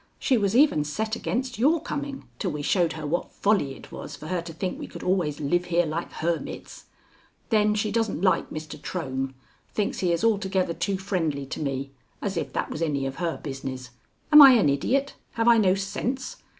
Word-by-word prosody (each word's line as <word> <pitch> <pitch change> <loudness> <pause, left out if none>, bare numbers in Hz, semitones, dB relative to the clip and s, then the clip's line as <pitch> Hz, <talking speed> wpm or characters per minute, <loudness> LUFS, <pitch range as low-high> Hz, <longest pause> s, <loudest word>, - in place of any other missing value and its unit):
She 260 - +2
was 205 -2 +1
even 260 - +5
set 215 +9 -2
against 250 0 -3
your 305 +7 +4
coming 285 -1 -5
till 190 - -1
we 150 -2 -4
showed 170 0 +2
her 155 -1 -6
what 165 +4 -2
folly 195 -10 +1
it - - -14
was - - -7
for 155 - -9
her 180 -2 0
to 170 0 -8
think 180 +3 -4
we - - -6
could - - -9
always 175 -6 0
live 175 +5 +1
here 175 0 +2
like 160 +2 -3
hermits. 170 0 -4 0.6
Then 210 -1 +3
she 210 0 0
doesn't 225 -4 0
like 190 - +2
Mr. 155 0 -7
Trohm; 135 -6 -3 0.4
thinks 210 - -1
he 180 -2 +1
is 170 +5 0
altogether 190 -5 +1
too 195 +3 -1
friendly 165 -8 -2
to 135 - -6
me 135 -1 -3 0.3
as 195 -2 -3
if 145 -5 -3
that - - -2
was 155 - -5
any 145 -4 0
of 135 0 -4
her 170 -2 -2
business. 130 -2 -6 0.4
Am 300 0 +11
I 270 -2 +11
an 215 -11 +4
idiot? 270 - +1 0.2
Have 230 0 0
I 235 -1 +7
no 190 -3 +4
sense? 235 +7 -3
180 Hz, 205 wpm, -26 LUFS, 150-215 Hz, 0.6 s, Am